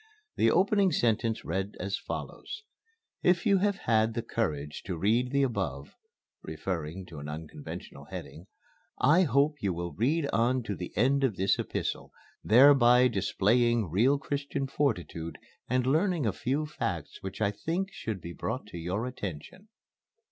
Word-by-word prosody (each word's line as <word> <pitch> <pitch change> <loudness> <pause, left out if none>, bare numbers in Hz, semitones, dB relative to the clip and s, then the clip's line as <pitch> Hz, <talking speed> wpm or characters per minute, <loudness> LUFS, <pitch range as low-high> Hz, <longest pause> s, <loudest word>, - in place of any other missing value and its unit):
The - - +4
opening 200 0 +3
sentence 115 -4 +1
read 95 +4 -2
as 100 +1 -2
follows: 420 +1 -6 0.6
"If 180 +1 +3
you 200 -3 +4
have 200 +1 +2
had 110 - +1
the 115 - -2
courage 75 -9 -2
to 90 -3 -3
read 115 +8 +2
the 140 +1 +2
above" 125 -4 -2 0.5
(referring 90 0 -4
to 75 - -10
an 75 +1 -7
unconventional 75 -1 -8
heading) 85 +5 -9 0.5
"I 165 +5 +5
hope 140 +1 +2
you 100 -3 0
will 85 0 -4
read 145 +7 +1
on 125 +2 +2
to 105 -3 -3
the 90 0 -6
end 135 +5 +3
of 125 -7 +2
this 95 +2 +1
epistle - - -3 0.3
thereby 125 0 +7
displaying 115 0 +2
real 120 - +4
Christian 140 0 -3
fortitude 90 - -2 0.3
and 125 0 +1
learning 160 +2 +2
a 105 - +1
few 140 +8 -1
facts 150 - -4
which 95 0 -6
I 100 -2 +2
think 175 - -3
should 105 -5 -5
be 85 +1 -7
brought - - -4
to 85 - -7
your 95 +7 -2
attention." 125 - -7
115 Hz, 155 wpm, -29 LUFS, 95-140 Hz, 0.6 s, thereby